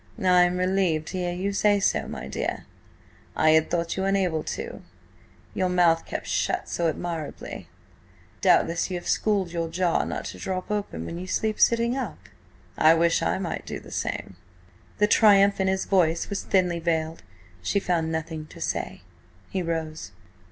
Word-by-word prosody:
"I 180 Hz, -1 st, +5 dB
am 180 Hz, 0 st, -1 dB
relieved 185 Hz, -4 st, +1 dB
to 185 Hz, -, -4 dB
hear 175 Hz, -1 st, -1 dB
you 190 Hz, +3 st, -2 dB
say 205 Hz, 0 st, +3 dB
so, -, -, +1 dB
my 65 Hz, -, -6 dB
dear. 70 Hz, -, -3 dB, 0.7 s
I 155 Hz, -, +4 dB
had 160 Hz, 0 st, +4 dB
thought 170 Hz, -1 st, -1 dB
you 190 Hz, -, -2 dB
unable 190 Hz, -5 st, +1 dB
to–your 445 Hz, -, -7 dB
mouth 175 Hz, -2 st, +3 dB
kept -, -, -4 dB
shut -, -, -1 dB
so 170 Hz, -, 0 dB
admirably. 165 Hz, -2 st, -5 dB, 0.7 s
Doubtless 170 Hz, +2 st, +3 dB
you 180 Hz, -, -2 dB
have 175 Hz, -, -8 dB
schooled 200 Hz, -5 st, +1 dB
your 170 Hz, -1 st, -2 dB
jaw 175 Hz, 0 st, +1 dB
not -, -, -4 dB
to -, -, -7 dB
drop 185 Hz, +2 st, -4 dB, 0.2 s
when 85 Hz, -, -6 dB
you 185 Hz, -, -6 dB
sleep 215 Hz, +3 st, -1 dB
sitting 235 Hz, +1 st, +3 dB
up? 270 Hz, -, -4 dB, 0.6 s
I 160 Hz, +1 st, +7 dB
wish 165 Hz, 0 st, +2 dB
I -, -, +1 dB
might 185 Hz, -3 st, -4 dB
do -, -, -4 dB
the -, -, -14 dB
same." 95 Hz, -, -4 dB, 0.6 s
The 210 Hz, -, +4 dB
triumph 200 Hz, -2 st, +5 dB
in 190 Hz, -, +2 dB
his 190 Hz, 0 st, 0 dB
voice 170 Hz, -2 st, +2 dB
was 200 Hz, -, -2 dB
thinly 180 Hz, -3 st, +1 dB
veiled. 160 Hz, -1 st, -1 dB, 0.4 s
She 145 Hz, -, +1 dB
found 165 Hz, -4 st, 0 dB
nothing 160 Hz, -1 st, -4 dB
to -, -, -13 dB
say. -, -, -3 dB, 0.5 s
He 190 Hz, -, -1 dB
rose. 160 Hz, -, -4 dB
180 Hz, 165 wpm, -25 LUFS, 165-195 Hz, 0.7 s, I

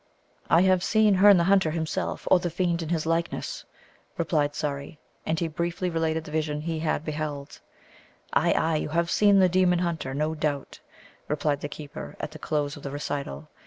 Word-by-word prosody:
"I 170 Hz, -, +5 dB
have 185 Hz, -1 st, +3 dB
seen 215 Hz, -1 st, +4 dB
Herne 195 Hz, +1 st, +7 dB
the 170 Hz, -, +3 dB
Hunter 190 Hz, -2 st, +3 dB
himself, 160 Hz, 0 st, -3 dB
or 185 Hz, -, +7 dB
the 175 Hz, -, -2 dB
fiend 170 Hz, 0 st, 0 dB
in 160 Hz, -, -5 dB
his 165 Hz, -2 st, -1 dB
likeness," 165 Hz, +1 st, -2 dB, 0.5 s
replied 150 Hz, -3 st, 0 dB
Surrey. 145 Hz, 0 st, -4 dB, 0.3 s
And 160 Hz, 0 st, 0 dB
he 170 Hz, -, 0 dB
briefly 170 Hz, +3 st, -2 dB
related 160 Hz, -1 st, 0 dB
the 155 Hz, -, -10 dB
vision 150 Hz, -1 st, -1 dB
he 160 Hz, 0 st, -3 dB
had 155 Hz, -1 st, -1 dB
beheld. 150 Hz, -2 st, -5 dB, 0.7 s
"Ay, -, -, +3 dB
ay, 160 Hz, 0 st, +1 dB
you 150 Hz, -, -3 dB
have 170 Hz, +2 st, 0 dB
seen 205 Hz, -1 st, +5 dB
the 190 Hz, -1 st, +6 dB
demon 180 Hz, 0 st, +3 dB
hunter, 165 Hz, -6 st, -2 dB
no 155 Hz, +2 st, 0 dB
doubt," 150 Hz, -3 st, -3 dB, 0.5 s
replied 145 Hz, -1 st, -1 dB
the 145 Hz, -, -4 dB
keeper 140 Hz, -, -8 dB
at -, -, -4 dB
the -, -, -10 dB
close 145 Hz, -2 st, -1 dB
of 145 Hz, -, -11 dB
the 140 Hz, -, -5 dB
recital. 140 Hz, -, -4 dB
160 Hz, 190 wpm, -26 LUFS, 150-175 Hz, 0.7 s, Herne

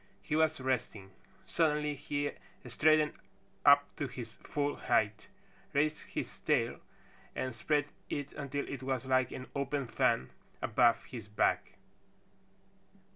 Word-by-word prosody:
He 150 Hz, -, -1 dB
was 160 Hz, -1 st, +3 dB
resting. 120 Hz, -7 st, -2 dB, 0.3 s
Suddenly 150 Hz, -2 st, +1 dB
he 145 Hz, 0 st, -2 dB, 0.4 s
straightened 155 Hz, +4 st, +4 dB, 0.5 s
up -, -, +8 dB
to -, -, -1 dB
his -, -, -7 dB
full 145 Hz, 0 st, -2 dB
height, 110 Hz, -3 st, +1 dB, 0.5 s
raised 155 Hz, +2 st, +2 dB
his -, -, -5 dB
tail -, -, +1 dB, 0.6 s
and 130 Hz, -1 st, -2 dB
spread 145 Hz, +5 st, +1 dB, 0.2 s
it 145 Hz, -1 st, -3 dB
until 140 Hz, 0 st, -3 dB
it 140 Hz, -, -5 dB
was 130 Hz, -1 st, -2 dB
like 130 Hz, -1 st, +3 dB
an 130 Hz, -, -6 dB
open 140 Hz, 0 st, -1 dB
fan 65 Hz, -, +1 dB, 0.3 s
above 120 Hz, -1 st, +3 dB
his 115 Hz, -5 st, -8 dB
back. 105 Hz, -, +1 dB
140 Hz, 125 wpm, -33 LUFS, 125-150 Hz, 0.6 s, up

